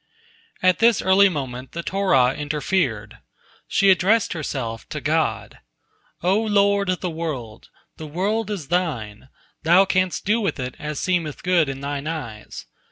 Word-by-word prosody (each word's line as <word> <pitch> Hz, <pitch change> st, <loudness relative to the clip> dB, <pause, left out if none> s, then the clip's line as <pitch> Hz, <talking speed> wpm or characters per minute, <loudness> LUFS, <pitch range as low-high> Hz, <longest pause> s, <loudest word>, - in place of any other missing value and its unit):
At 185 Hz, -1 st, +4 dB
this 230 Hz, -1 st, +4 dB
early 195 Hz, +1 st, +5 dB
moment 130 Hz, -5 st, -5 dB
the 170 Hz, -, -4 dB
Torah 185 Hz, -11 st, +2 dB
interfered. 145 Hz, -, -2 dB, 0.5 s
She 195 Hz, -1 st, +4 dB
addressed 200 Hz, +4 st, +2 dB
herself 130 Hz, -8 st, -5 dB
to -, -, -4 dB
God: -, -, -1 dB, 0.6 s
"O 190 Hz, +5 st, +3 dB
Lord 200 Hz, -2 st, +2 dB
of 185 Hz, -, -1 dB
the 180 Hz, -, -2 dB
world! 140 Hz, -10 st, -6 dB, 0.3 s
The 155 Hz, -, -7 dB
world 200 Hz, +7 st, -1 dB
is 185 Hz, -9 st, -5 dB
Thine, 130 Hz, -, -2 dB, 0.3 s
Thou 175 Hz, +4 st, +5 dB
canst 185 Hz, -1 st, 0 dB
do 215 Hz, +3 st, +2 dB
with 185 Hz, -9 st, -2 dB
it 125 Hz, 0 st, -4 dB
as 150 Hz, -1 st, -4 dB
seemeth 170 Hz, -5 st, -1 dB
good 175 Hz, -5 st, +2 dB
in 135 Hz, 0 st, -6 dB
Thine 140 Hz, +1 st, -4 dB
eyes. 125 Hz, -10 st, -6 dB
170 Hz, 150 wpm, -22 LUFS, 135-190 Hz, 0.6 s, early